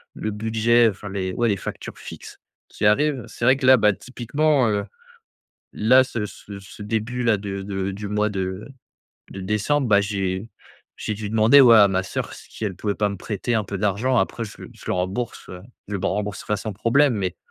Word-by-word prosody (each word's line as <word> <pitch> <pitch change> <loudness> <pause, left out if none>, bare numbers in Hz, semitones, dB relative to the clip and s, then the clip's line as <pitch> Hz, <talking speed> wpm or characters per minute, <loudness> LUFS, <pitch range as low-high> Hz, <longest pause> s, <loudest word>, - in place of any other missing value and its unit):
le 110 - -3
budget, 115 +2 +3
enfin 100 +1 -8
les 95 -1 -3
ouais 120 - +1
les 100 - +2
factures - - -7
fixes, - - -10 0.3
qui - - -4
arrivent. 135 +4 +2
C'est 115 - -4
vrai 130 +2 +5
que 135 - -3
là, 130 0 +8
bah, 105 -2 +4
typiquement, 130 +3 0
heu, 105 -1 -1 0.9
là 130 +5 +5
ce 115 -4 -4
ce 100 0 -10
ce 100 +2 -12
début 115 +3 -2
là, 115 -2 +4
de 100 -1 -5
de 95 -1 -3
du 100 +2 -6
mois 105 +1 +1
de 95 0 -4 0.6
de 95 - -7
décembre, 105 +8 0
bah, 100 -1 +5
j'ai 100 0 -2 0.5
j'ai 110 - -3
dû 105 0 -5
demander 110 +6 +6
au 125 -3 +7
à 110 -3 +8
ma 95 0 0
soeur, - - -5
si 110 - -9
elle 95 -3 -2
pouvait 100 +2 -2
pas 105 -1 +1
me 100 - -5
prêter 105 +5 -3
un 110 -2 +1
peu 100 0 -5
d'argent. 105 +6 +1
Après, 115 - -1
je 105 - -11
le - - -9
je - - -17
le - - +1
rembourse, 95 +7 -3
heu 90 0 -9 0.3
je 105 - -4
le 95 - -5
rembourserai 105 +1 -2
sans 105 +2 -5
problème. 120 +6 +3
Mais 95 -4 -2
105 Hz, 210 wpm, -23 LUFS, 100-120 Hz, 0.9 s, là